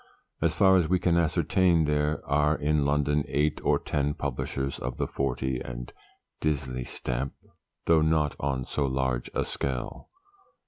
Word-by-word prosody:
As -, -, +1 dB
far 95 Hz, 0 st, +6 dB
as 85 Hz, -4 st, +1 dB
we 95 Hz, -, +4 dB
can 90 Hz, -1 st, +1 dB
ascertain, 85 Hz, +1 st, +3 dB
there 75 Hz, +1 st, 0 dB
are 75 Hz, +2 st, +2 dB
in 75 Hz, 0 st, +1 dB
London 75 Hz, +1 st, +1 dB
eight 75 Hz, +2 st, 0 dB
or -, -, +3 dB
ten 75 Hz, 0 st, -1 dB
publishers 70 Hz, 0 st, -3 dB
of 60 Hz, 0 st, -4 dB
the -, -, 0 dB
Fortey 65 Hz, -2 st, -2 dB
and -, -, -7 dB, 0.5 s
Disley 65 Hz, -5 st, -2 dB
stamp 65 Hz, +2 st, -3 dB, 0.5 s
though 80 Hz, -1 st, +5 dB
not 80 Hz, -2 st, +2 dB
on 65 Hz, -3 st, -1 dB
so 70 Hz, -2 st, -1 dB
large 65 Hz, -2 st, -1 dB
a -, -, +1 dB
scale. 65 Hz, -3 st, -4 dB
75 Hz, 150 wpm, -27 LUFS, 65-80 Hz, 0.5 s, far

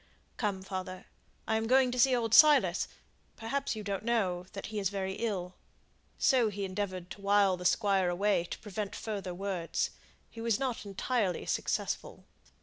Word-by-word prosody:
Come, 200 Hz, -4 st, -1 dB
father! 185 Hz, -1 st, -6 dB, 0.4 s
I 220 Hz, -, +2 dB
am 220 Hz, 0 st, -1 dB
going 255 Hz, +1 st, +4 dB
to 250 Hz, -, -3 dB
see 255 Hz, +1 st, +5 dB
old 225 Hz, -2 st, -1 dB
Silas 305 Hz, +2 st, +6 dB, 0.5 s
perhaps 270 Hz, +3 st, -2 dB
you 215 Hz, -, -6 dB
don't 200 Hz, 0 st, -3 dB
know 190 Hz, -7 st, 0 dB
that 195 Hz, -, -6 dB
he 210 Hz, -, -1 dB
is 195 Hz, -3 st, 0 dB
very 190 Hz, -1 st, -3 dB
ill." 190 Hz, -6 st, -2 dB, 0.6 s
So 245 Hz, -4 st, +3 dB
he 200 Hz, -1 st, -4 dB
endeavoured 185 Hz, -2 st, -4 dB
to 200 Hz, -, -9 dB
wile 200 Hz, -1 st, +4 dB
the 180 Hz, 0 st, -9 dB
Squire 195 Hz, -2 st, +3 dB
away 185 Hz, 0 st, +1 dB
to -, -, -6 dB
prevent 210 Hz, -1 st, -5 dB
further 195 Hz, -5 st, -4 dB
words. 185 Hz, -3 st, -2 dB, 0.4 s
He 230 Hz, -, -9 dB
was 230 Hz, -2 st, +1 dB
not 255 Hz, -6 st, -3 dB
entirely 200 Hz, -2 st, -1 dB
successful. -, -, -2 dB
200 Hz, 165 wpm, -31 LUFS, 190-225 Hz, 0.6 s, Silas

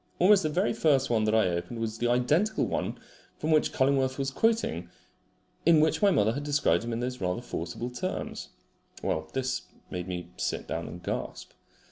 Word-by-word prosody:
Almost 195 Hz, +2 st, +6 dB
the 155 Hz, -, 0 dB
very 180 Hz, +7 st, +1 dB
first 140 Hz, -, +2 dB
one 110 Hz, -2 st, +2 dB
that 110 Hz, +1 st, +2 dB
I 110 Hz, -4 st, +4 dB
opened 85 Hz, +7 st, -3 dB
was 110 Hz, -1 st, -3 dB
the 120 Hz, -, +1 dB
identical 150 Hz, -, +2 dB
one -, -, -2 dB, 0.4 s
from 155 Hz, -, -1 dB
which 155 Hz, -1 st, +3 dB
Cullingworth 130 Hz, -1 st, +2 dB
was 135 Hz, -1 st, -1 dB
quoting 175 Hz, -, 0 dB, 0.7 s
in 165 Hz, -1 st, +6 dB
which 160 Hz, +1 st, +2 dB
my 205 Hz, -, +6 dB
mother 110 Hz, -, +3 dB
had 140 Hz, +3 st, -4 dB
described 145 Hz, -, +2 dB
him 120 Hz, -, -4 dB
in 115 Hz, +1 st, -2 dB
those 125 Hz, -1 st, -3 dB
rather 90 Hz, +6 st, -1 dB
forcible 110 Hz, +4 st, -4 dB
terms. 125 Hz, -, -4 dB, 0.5 s
Well, -, -, -1 dB
this 130 Hz, -1 st, -1 dB, 0.3 s
made 90 Hz, 0 st, -4 dB
me 90 Hz, -1 st, -5 dB
sit -, -, -2 dB
down -, -, -3 dB
and 85 Hz, +3 st, -9 dB
gasp. -, -, -4 dB
125 Hz, 185 wpm, -28 LUFS, 110-155 Hz, 0.7 s, Almost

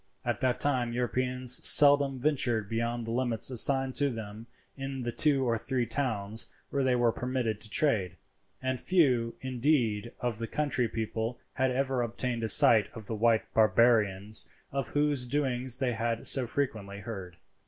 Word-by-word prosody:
At -, -, -2 dB
that 125 Hz, -1 st, 0 dB
time 125 Hz, -4 st, 0 dB
Europeans 125 Hz, +1 st, -1 dB
seldom 140 Hz, -2 st, +6 dB
ventured 125 Hz, -6 st, 0 dB
beyond 115 Hz, +2 st, -3 dB
the 115 Hz, -, -5 dB
limits 120 Hz, 0 st, -1 dB
assigned 135 Hz, +1 st, +3 dB
to 145 Hz, -1 st, +1 dB
them 110 Hz, -1 st, -8 dB, 0.3 s
in 135 Hz, -1 st, -6 dB
the 120 Hz, -1 st, -3 dB
two 135 Hz, 0 st, +1 dB
or 115 Hz, -1 st, 0 dB
three 130 Hz, 0 st, -2 dB
towns 110 Hz, -5 st, -2 dB, 0.2 s
where 140 Hz, -1 st, -1 dB
they 130 Hz, -1 st, +1 dB
were 120 Hz, -1 st, +2 dB
permitted 120 Hz, -4 st, -3 dB
to 110 Hz, -, -6 dB
trade, 105 Hz, -, 0 dB, 0.5 s
and 130 Hz, -1 st, -2 dB
few, 125 Hz, -11 st, +1 dB
indeed, 125 Hz, -4 st, -1 dB
of 120 Hz, -3 st, -3 dB
the 115 Hz, -, -4 dB
country 145 Hz, -4 st, -1 dB
people 115 Hz, +1 st, -4 dB, 0.2 s
had 130 Hz, 0 st, 0 dB
ever 130 Hz, 0 st, -1 dB
obtained 120 Hz, 0 st, -3 dB
a -, -, -1 dB
sight 110 Hz, 0 st, +6 dB
of 110 Hz, -2 st, -9 dB
the 115 Hz, -, -4 dB
white 110 Hz, +1 st, +2 dB
barbarians 105 Hz, -4 st, +2 dB, 0.2 s
of 135 Hz, -3 st, -3 dB
whose 145 Hz, -4 st, 0 dB
doings 130 Hz, -2 st, -1 dB
they 130 Hz, -2 st, -1 dB
had 115 Hz, 0 st, -3 dB
so 130 Hz, -3 st, +4 dB
frequently 105 Hz, -7 st, -4 dB
heard. 95 Hz, -6 st, -8 dB
120 Hz, 165 wpm, -28 LUFS, 115-130 Hz, 0.5 s, seldom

